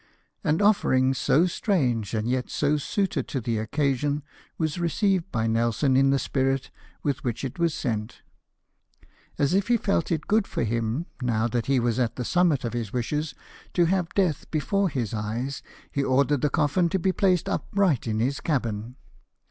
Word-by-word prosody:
An 155 +7 +1
offering 135 -11 +3
so 140 +5 +3
strange, 130 - 0
and 110 +1 -1
yet 125 0 -1
so 150 0 +1
suited 195 +6 -1
to 135 - -2
the 115 -2 -1
occasion, 140 +4 0 0.3
was 160 0 -1
received 190 +1 +1
by 115 -2 0
Nelson 115 +4 +1
in 135 +1 +5
the 140 - +3
spirit 135 0 -1 0.3
with 140 -2 -1
which 120 -1 -3
it 135 - -6
was 170 -2 +1
sent. 110 -4 -3 1.1
As 140 +3 +2
if 195 +1 +2
he 240 0 +4
felt 200 -7 0
it 160 -2 -1
good 215 -1 +2
for - - -2
him, 115 +6 -1 0.2
now 120 -2 +1
that 120 -1 -2
he 135 -2 +3
was 120 0 0
at 120 -3 0
the 125 - -4
summit 175 -4 +2
of 115 - -3
his 115 -4 -3
wishes, 150 +5 -2 0.4
to 175 - +4
have 180 0 +1
death 180 -7 0
before 195 +5 +1
his 120 -8 -3
eyes, 115 +6 -3 0.3
he 140 - 0
ordered 140 +1 +2
the 150 - +2
coffin 155 +5 +2
to 190 - +1
be 190 +1 +1
placed 185 -4 +2
upright 185 - 0
in 110 -1 -1
his 135 +5 0
cabin. 120 -5 -2
140 Hz, 180 wpm, -26 LUFS, 120-170 Hz, 1.1 s, in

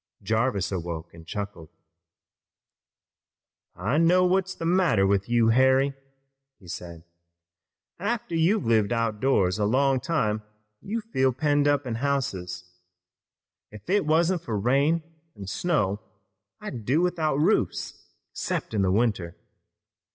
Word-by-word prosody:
Jarvis 110 -2 0
awoke 85 -3 -5
and 80 -1 -14
chuckled. 100 -6 -6 2.1
"I 145 +5 0
know 180 +2 +4
what's 190 +1 +1
the 165 - -5
matter 170 - +3
with 100 +2 +1
you, 120 -1 +3
Harry," 130 +3 +4 0.7
he 95 - -17
said. 85 -2 -8 1.0
"After 205 -3 -3
you've 165 - +2
lived 110 -1 +2
out 115 -2 0
of 105 - -17
doors 105 -8 +2
a 105 - +2
long 135 +4 +2
time 110 -10 -1 0.4
you 225 +3 -3
feel 130 -12 +1
penned 145 +2 +1
up 145 -1 +2
in 120 - -3
houses. 115 -9 -2 1.1
If 105 - -8
it 200 -5 +2
wasn't 170 +3 +2
for 115 -10 -3
rain 140 +9 +2 0.3
an' 100 - -8
snow 105 - 0 0.6
I'd 115 - -7
do 135 +10 +2
without 160 -5 0
roofs 150 +3 0 0.3
'cept - - -3
in 95 -3 +1
winter. 100 -5 0
125 Hz, 130 wpm, -26 LUFS, 100-160 Hz, 2.1 s, know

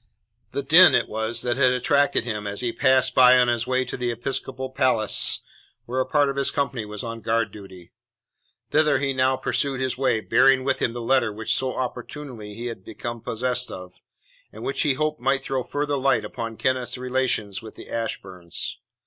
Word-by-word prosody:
The - - -4
din - - +8
it - - +2
was 110 +1 -2
that 120 0 0
had 130 -2 +4
attracted 140 +3 +2
him 105 -3 -4
as 100 +2 -3
he 120 -2 -1
passed 130 +1 +3
by 125 0 +7
on 125 -1 +4
his 120 0 -1
way 130 0 +1
to - - -5
the 125 -1 -2
Episcopal 130 +2 -4
Palace 125 -5 +2 0.4
where 125 +2 -3
a 130 - 0
part 145 -2 +3
of 140 0 -3
his 140 - +2
company 130 -5 -2
was 105 0 -7
on 115 -1 -6
guard 115 -2 0
duty. 95 -4 -12 0.8
Thither 150 -2 +3
he 135 0 -1
now 130 0 +2
pursued 135 -1 -1
his 130 -1 -2
way, 130 -4 +2
bearing 130 +4 +4
with 140 - 0
him 115 - 0
the 120 - -5
letter 120 -1 +2
which 110 +1 -1
so 130 +2 -1
opportunely 125 -3 -6
he 120 +2 -6
had 115 -6 -6
become 120 +2 -7
possessed 125 +2 -2
of, 90 -1 -9 0.6
and - - -10
which 405 +1 -1
he 145 -5 +2
hoped 155 0 -2
might 135 +2 +1
throw 130 -1 -2
further 145 +1 -2
light 130 -5 +2
upon 115 +1 -6
Kenneth's 130 -1 -1
relations 125 -5 -1
with 110 -1 -11
the - - -11
Ashburns. 95 -6 -4
125 Hz, 195 wpm, -24 LUFS, 115-130 Hz, 0.8 s, din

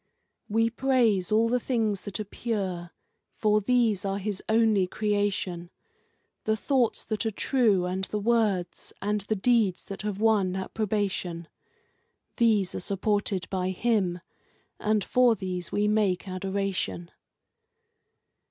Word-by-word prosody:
We 225 +2 +2
praise 235 -7 +2
all 220 +2 +4
the 250 +2 +1
things 220 -6 -1
that 205 +1 -5
are - - -1
pure, 190 -6 -3 0.5
for 215 -1 +2
these 225 -3 +2
are 195 0 -1
His 200 -1 -3
only 220 -4 +3
Creation 205 -4 -1 0.8
The 220 0 +1
thoughts 250 0 +1
that 215 -2 -2
are 225 - 0
true, 215 -4 +2
and 185 +1 -2
the 210 - -3
words 210 -5 0
and 210 +1 -1
the 210 +2 -2
deeds 215 -3 +2
that 195 - -7
have 205 -1 -3
won 210 -4 +2
approbation; 190 -4 -2 0.9
These 215 -6 +3
are - - -3
supported 200 -1 -1
by 185 -1 -1
Him, 190 -3 0 0.6
and 215 -1 +1
for 250 +1 +4
these 185 -3 -5
we 205 +1 +1
make 205 -3 +1
adoration. 190 -2 -3
205 Hz, 130 wpm, -27 LUFS, 190-220 Hz, 0.9 s, all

